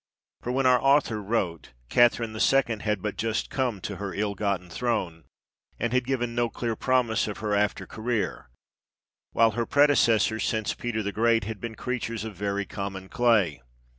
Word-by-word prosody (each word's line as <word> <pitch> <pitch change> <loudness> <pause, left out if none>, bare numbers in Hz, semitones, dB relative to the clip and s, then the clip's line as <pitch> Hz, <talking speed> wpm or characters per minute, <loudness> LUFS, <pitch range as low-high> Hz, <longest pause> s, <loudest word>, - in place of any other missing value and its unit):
For 125 - -3
when 130 +1 0
our 125 -1 +5
author 135 -6 +3
wrote, 95 - -2 0.2
Catherine 120 -2 +3
II. 120 -1 +2
had 105 -2 -2
but 105 -2 -3
just 115 0 -2
come 125 -6 -1
to 100 +1 -5
her 100 -1 -5
ill 105 0 -1
gotten 100 -3 -2
throne, 90 -5 -2 0.5
and 120 +1 -1
had 125 -1 +1
given 120 -3 -1
no 120 0 +1
clear 115 -1 -3
promise 120 -3 +1
of 105 - -5
her 105 -1 -2
after 105 0 0
career; 110 - -3 0.8
while 115 0 +4
her 115 +2 -2
predecessors, 115 -7 +3
since 110 -2 -1
Peter 115 -3 -3
the 100 - -2
Great, 115 0 +2
had 105 -1 -6
been 115 -1 -5
creatures 115 -2 -3
of 110 -1 -6
very 100 +1 -2
common 95 -1 -6
clay. 110 - +2
110 Hz, 170 wpm, -26 LUFS, 100-120 Hz, 0.8 s, our